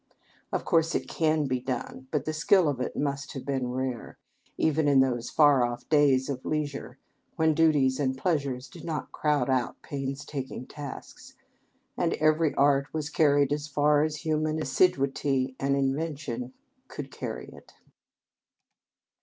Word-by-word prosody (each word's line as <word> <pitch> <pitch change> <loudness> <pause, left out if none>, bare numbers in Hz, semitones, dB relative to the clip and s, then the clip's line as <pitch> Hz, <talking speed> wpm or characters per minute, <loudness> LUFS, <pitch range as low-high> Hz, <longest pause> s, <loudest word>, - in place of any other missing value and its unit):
Of - - -2
course 165 -2 +2
it - - -1
can 155 -2 +1
be 130 -2 -1
done, 130 +1 -5
but 145 -2 -1
the 155 - -2
skill 165 +3 +4
of 135 -4 -1
it - - -3
must 140 0 -2
have 135 -2 -7
been 135 -2 -1
rare, 130 -2 -4 0.4
even 160 -1 +2
in 140 -2 +5
those 125 -3 +1
far 145 -4 +5
off 120 0 -3
days 140 -4 +4
of 135 -3 -4
leisure 150 -2 -3 0.4
when 160 0 +3
duties 150 -5 +3
and 130 -2 0
pleasures 140 -5 -1
did 170 -4 -13
not 160 -3 -4
crowd 150 -2 +1
out 130 -2 0
painstaking 135 -1 -5
tasks, 145 -1 -9 0.6
and - - 0
every 155 0 +2
art 140 0 +3
was 155 -1 -3
carried 145 -3 +3
as 150 0 -3
far 145 0 +3
as 155 +1 -2
human 155 0 0
assiduity 135 -5 +1
and 140 0 +1
invention 135 -3 -2 0.4
could - - -7
carry - - -6
it. - - -16
145 Hz, 150 wpm, -27 LUFS, 130-155 Hz, 0.6 s, in